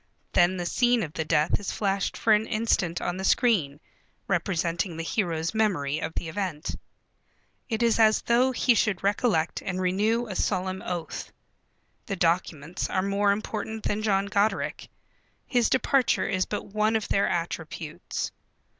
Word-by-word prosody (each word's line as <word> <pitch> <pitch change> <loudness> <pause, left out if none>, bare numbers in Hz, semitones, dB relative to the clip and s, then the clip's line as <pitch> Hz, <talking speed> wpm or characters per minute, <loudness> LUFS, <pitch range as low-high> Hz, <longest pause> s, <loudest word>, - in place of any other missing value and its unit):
Then 175 +2 +4
the 175 - -3
scene 240 +5 +2
of 155 -3 -6
the 160 - -2
death 155 0 +2
is 205 - -4
flashed 195 -1 -1
for 220 - +3
an 210 +1 +2
instant 205 -6 0
on 175 +1 -2
the 190 - -4
screen, 190 - +2 0.5
representing 170 -1 -1
the 165 - -3
hero's 165 -3 -1
memory 170 -10 +1
of - - -4
the 170 - -3
event. 165 -3 -3 0.9
It 225 0 0
is 230 -1 +3
as 215 -1 +4
though 245 +2 +3
he 245 0 +3
should 210 -4 +1
recollect 200 -5 +1
and 185 -1 -3
renew 210 +6 +1
a 200 -5 -6
solemn 185 0 -1
oath. 175 -2 -5 0.8
The 195 - -2
documents 170 -2 -1
are 185 - 0
more 200 +1 +2
important 215 +1 -3
than 205 +1 -1
John 200 -2 +1
Goderic. 200 +2 0 0.6
His 245 -3 +2
departure 260 0 +2
is 185 -1 0
but 210 - -4
one 215 +2 +1
of 220 - 0
their 200 - +2
attributes. 165 -1 -4
195 Hz, 155 wpm, -26 LUFS, 175-220 Hz, 0.9 s, Then